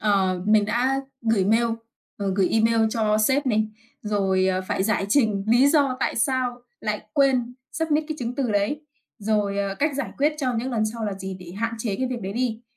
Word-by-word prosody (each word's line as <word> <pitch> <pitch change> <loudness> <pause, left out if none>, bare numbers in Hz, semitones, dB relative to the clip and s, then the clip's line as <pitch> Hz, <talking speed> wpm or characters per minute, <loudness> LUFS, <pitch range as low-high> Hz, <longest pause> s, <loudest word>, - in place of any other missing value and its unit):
ờ, 190 -3 +1
mình 210 -1 +5
đã 250 +5 +1 0.2
gửi 225 -4 +2
mail, 225 +4 +3 0.5
ờ, 200 -1 -1
gửi 190 -2 +3
email 225 +1 +3
cho 215 -2 +1
sếp 265 +6 +2
này, 215 -3 +2 0.3
rồi, 195 -3 +1
ờ, 185 0 +1
phải - - 0
giải 200 -1 0
trình 210 -5 +2
lý 245 +5 +5
do 285 -4 +3
tại - - 0
sao 245 0 0 0.2
lại 210 -1 -2
quên 255 -3 +2 0.2
submit 315 -1 0
cái 310 - -3
chứng 245 0 -3
từ 255 -3 -1
đấy. 205 +8 0 0.4
Rồi, 205 -2 0
ờ, 200 -1 -1
cách 285 +4 0
giải 290 - -3
quyết 295 +2 +2
cho 255 -4 0
những 250 +3 -2
lần 225 -3 0
sau 225 +1 -4
là 205 - -2
gì 190 0 -6
để 175 -1 -10
hạn 230 +4 -2
chế 215 -3 -2
cái 260 +4 -1
việc 240 -3 -4
đấy 190 +1 -4
đi. 235 0 -2
225 Hz, 210 wpm, -24 LUFS, 205-255 Hz, 0.5 s, mình